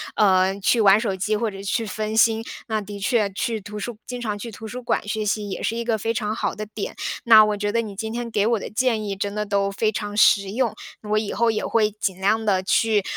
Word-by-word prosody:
呃， 190 Hz, -1 st, +3 dB
去 230 Hz, +5 st, +3 dB
玩 200 Hz, -2 st, +6 dB
手 220 Hz, -3 st, -1 dB
机 210 Hz, +3 st, 0 dB
或 220 Hz, 0 st, -1 dB
者 195 Hz, -1 st, -9 dB
去 225 Hz, +3 st, -1 dB
分 215 Hz, +2 st, -3 dB
心。 225 Hz, 0 st, +4 dB, 0.3 s
那 220 Hz, -2 st, 0 dB
的 205 Hz, 0 st, -7 dB
确， 205 Hz, +1 st, +1 dB
去 220 Hz, +3 st, -2 dB
图 210 Hz, +1 st, -9 dB
书 225 Hz, +2 st, -5 dB
经 250 Hz, -1 st, -5 dB
常 210 Hz, -3 st, -3 dB
去 230 Hz, -, -6 dB
图 220 Hz, 0 st, -10 dB
书 245 Hz, +3 st, -6 dB
馆 240 Hz, -, -1 dB
学 215 Hz, 0 st, -2 dB
习， 205 Hz, 0 st, -1 dB
也 190 Hz, -, -5 dB
是 225 Hz, -, -1 dB
一 235 Hz, -, -2 dB
个 230 Hz, -1 st, 0 dB
非 225 Hz, +2 st, -1 dB
常 210 Hz, -1 st, -2 dB
好 -, -, -2 dB
的 215 Hz, -, -5 dB
点。 210 Hz, -1 st, -6 dB, 0.3 s
那 220 Hz, -2 st, +9 dB
我 210 Hz, -1 st, 0 dB
觉 205 Hz, 0 st, -2 dB
得， 230 Hz, -, +2 dB
你 215 Hz, -3 st, -7 dB
今 220 Hz, +3 st, -5 dB
天 240 Hz, 0 st, -4 dB
给 210 Hz, -1 st, +1 dB
我 230 Hz, -2 st, +2 dB
的 -, -, -6 dB
建 230 Hz, -1 st, 0 dB
议， 200 Hz, -2 st, -4 dB
真 200 Hz, +1 st, -3 dB
的 210 Hz, 0 st, -1 dB
都 200 Hz, -1 st, 0 dB
非 215 Hz, +2 st, 0 dB
常 205 Hz, -1 st, -4 dB
实 200 Hz, -2 st, +4 dB
用。 235 Hz, +1 st, 0 dB, 0.4 s
我 215 Hz, -, +2 dB
以 215 Hz, -1 st, -1 dB
后 235 Hz, -1 st, +2 dB
也 215 Hz, -, -2 dB
会 215 Hz, -2 st, +2 dB
尽 195 Hz, -3 st, -3 dB
量 215 Hz, +3 st, +2 dB
地 190 Hz, -3 st, +2 dB
去， 215 Hz, +1 st, +2 dB
215 Hz, 280 characters per minute, -23 LUFS, 200-225 Hz, 0.4 s, 那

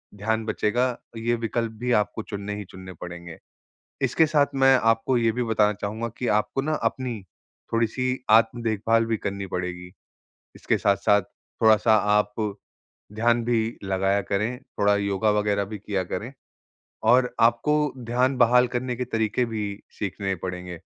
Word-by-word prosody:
ध्यान 110 Hz, +2 st, -1 dB
बचेगा, 120 Hz, +3 st, 0 dB, 0.2 s
ये 120 Hz, +1 st, 0 dB
विकल्प 115 Hz, 0 st, -2 dB
भी 125 Hz, -, -1 dB
आपको 105 Hz, 0 st, +1 dB
चुनने 105 Hz, -1 st, -5 dB
ही 105 Hz, -, -5 dB
चुनने 95 Hz, -1 st, -10 dB
पड़ेंगे। 85 Hz, -1 st, -8 dB, 0.7 s
इसके 160 Hz, -, +3 dB
साथ 150 Hz, -2 st, +3 dB
मैं 135 Hz, 0 st, +5 dB
आपको 115 Hz, +3 st, +2 dB
ये 115 Hz, -1 st, +2 dB
भी 125 Hz, +2 st, -2 dB
बताना 110 Hz, -2 st, +2 dB
चाहूँगा 105 Hz, +3 st, -4 dB
कि 125 Hz, -, -2 dB
आपको 105 Hz, +5 st, +1 dB
ना 155 Hz, -, -1 dB, 0.2 s
अपनी, 125 Hz, -5 st, -6 dB, 0.5 s
थोड़ी-सी 125 Hz, +3 st, 0 dB
आत्म 115 Hz, +2 st, +4 dB
देखभाल 115 Hz, +1 st, +1 dB
भी 115 Hz, -, 0 dB
करनी 100 Hz, 0 st, -4 dB
पड़ेगी, 90 Hz, -1 st, -5 dB, 0.6 s
इसके -, -, 0 dB
साथ-साथ 100 Hz, +1 st, +3 dB, 0.4 s
थोड़ा-सा 110 Hz, 0 st, +5 dB
आप 105 Hz, 0 st, +2 dB, 0.8 s
ध्यान 115 Hz, +2 st, +1 dB
भी 115 Hz, -1 st, 0 dB
लगाया 95 Hz, +1 st, +1 dB
करें, 105 Hz, +6 st, -2 dB
थोड़ा 100 Hz, 0 st, +1 dB
योगा 100 Hz, +1 st, +1 dB
वग़ैरह 105 Hz, -1 st, +1 dB
भी 105 Hz, +1 st, -7 dB
किया 100 Hz, -1 st, -2 dB
करें 105 Hz, +8 st, -5 dB, 0.8 s
और 125 Hz, 0 st, +4 dB
आपको 150 Hz, +6 st, +3 dB
ध्यान 125 Hz, +3 st, +1 dB
बहाल 125 Hz, +1 st, +5 dB
करने 125 Hz, 0 st, -3 dB
के 125 Hz, -, -2 dB
तरीके 110 Hz, 0 st, 0 dB
भी 110 Hz, -2 st, -3 dB, 0.3 s
सीखने 100 Hz, -1 st, -2 dB
पड़ेंगे। 90 Hz, -2 st, -6 dB
110 Hz, 150 wpm, -25 LUFS, 100-120 Hz, 0.8 s, मैं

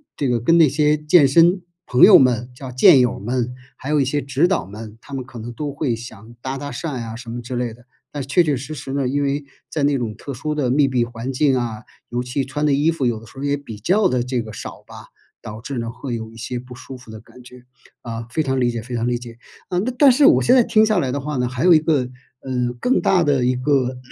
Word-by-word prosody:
这 140 Hz, -, -1 dB
个 120 Hz, -1 st, +1 dB
跟 165 Hz, +9 st, +3 dB
那 160 Hz, -3 st, +6 dB
些 150 Hz, +2 st, +2 dB
健 150 Hz, -1 st, +4 dB
身 170 Hz, +6 st, +4 dB, 0.2 s
朋 125 Hz, -, +3 dB
友 -, -, +10 dB
们， 125 Hz, -2 st, +2 dB
叫 130 Hz, -1 st, -8 dB
健 130 Hz, +1 st, +6 dB
友 125 Hz, -1 st, +1 dB
们， 125 Hz, +3 st, -2 dB, 0.2 s
还 135 Hz, -, -8 dB
有 150 Hz, -1 st, +2 dB
一 135 Hz, -, +2 dB
些 145 Hz, +2 st, -1 dB
指 140 Hz, +5 st, +1 dB
导 190 Hz, -, 0 dB
们， 105 Hz, +2 st, -10 dB
他 140 Hz, -, -13 dB
们 130 Hz, -1 st, -3 dB
可 125 Hz, -1 st, -13 dB
能 115 Hz, +2 st, -7 dB
都 145 Hz, +2 st, -4 dB
会 140 Hz, -6 st, -1 dB
想 115 Hz, 0 st, -11 dB
搭 135 Hz, +1 st, -4 dB
搭 145 Hz, +1 st, -6 dB
讪 165 Hz, -, -4 dB
啊 115 Hz, 0 st, -7 dB
什 120 Hz, -1 st, -10 dB
么 120 Hz, +1 st, -5 dB
之 125 Hz, +1 st, -6 dB
类 120 Hz, -2 st, -2 dB
的。 120 Hz, +1 st, -19 dB, 0.2 s
但 145 Hz, -2 st, -5 dB
确 160 Hz, +7 st, +2 dB
确 150 Hz, -4 st, +1 dB
实 140 Hz, +5 st, -6 dB
实 135 Hz, -1 st, -7 dB
呢， 140 Hz, -2 st, 0 dB
因 145 Hz, +2 st, -1 dB
为 140 Hz, +1 st, -1 dB, 0.3 s
在 150 Hz, -3 st, -2 dB
那 140 Hz, -1 st, +2 dB
种 115 Hz, -3 st, -4 dB
特 140 Hz, +5 st, -8 dB
殊 150 Hz, +3 st, -4 dB
的 130 Hz, -5 st, 0 dB
密 140 Hz, 0 st, +3 dB
闭 125 Hz, -2 st, +1 dB
环 120 Hz, +2 st, -6 dB
境 135 Hz, 0 st, +2 dB
啊， 110 Hz, -3 st, -4 dB, 0.3 s
尤 120 Hz, +1 st, -2 dB
其 130 Hz, +2 st, -2 dB
穿 150 Hz, +2 st, -3 dB
的 145 Hz, -, +3 dB
衣 145 Hz, +4 st, +2 dB
服 160 Hz, -6 st, -1 dB
有 115 Hz, -2 st, 0 dB
的 115 Hz, -, -15 dB
时 135 Hz, -, -17 dB
候 140 Hz, -, -6 dB
也 145 Hz, 0 st, 0 dB
比 115 Hz, -7 st, -10 dB
较 190 Hz, -, +2 dB
的 125 Hz, -5 st, 0 dB
这 125 Hz, -1 st, -2 dB
个 110 Hz, -1 st, -9 dB
少 -, -, -8 dB
吧， -, -, -12 dB, 0.3 s
导 105 Hz, +1 st, -8 dB
致 135 Hz, +1 st, -6 dB
呢， 115 Hz, 0 st, -3 dB
会 125 Hz, 0 st, -5 dB
有 110 Hz, 0 st, -7 dB
一 115 Hz, -, -15 dB
些 120 Hz, +2 st, -5 dB
不 125 Hz, 0 st, -10 dB
舒 130 Hz, +1 st, -10 dB
服 125 Hz, -3 st, -14 dB
的 110 Hz, -, -9 dB
感 125 Hz, +2 st, -17 dB
觉， 125 Hz, 0 st, -15 dB, 0.4 s
啊， 115 Hz, -1 st, -6 dB
非 160 Hz, -, 0 dB
常 135 Hz, -3 st, -1 dB
理 120 Hz, -1 st, +2 dB
解 115 Hz, -1 st, -4 dB
非 120 Hz, +1 st, -7 dB
常 115 Hz, +1 st, -1 dB
理 120 Hz, -1 st, -1 dB
解。 120 Hz, -1 st, -11 dB, 0.3 s
啊， 180 Hz, -, -3 dB
那 245 Hz, +6 st, -1 dB
但 285 Hz, -2 st, +8 dB
是 275 Hz, +3 st, +4 dB
我 -, -, +6 dB
现 250 Hz, -, +4 dB
在 245 Hz, -, +6 dB
听 215 Hz, 0 st, +3 dB
下 215 Hz, -3 st, +1 dB
来 130 Hz, -5 st, -1 dB
的 140 Hz, -, -2 dB
话 150 Hz, +1 st, -4 dB
呢， 125 Hz, 0 st, 0 dB
还 125 Hz, +4 st, -3 dB
有 180 Hz, -, +7 dB
一 155 Hz, -, +6 dB
个， 145 Hz, -5 st, 0 dB, 0.3 s
呃， 125 Hz, -2 st, -2 dB
更 255 Hz, -, +1 dB
大 180 Hz, -3 st, +3 dB
的 135 Hz, -4 st, +1 dB
一 125 Hz, 0 st, +2 dB
个 130 Hz, -1 st, 0 dB
130 Hz, 295 characters per minute, -20 LUFS, 120-145 Hz, 0.4 s, 友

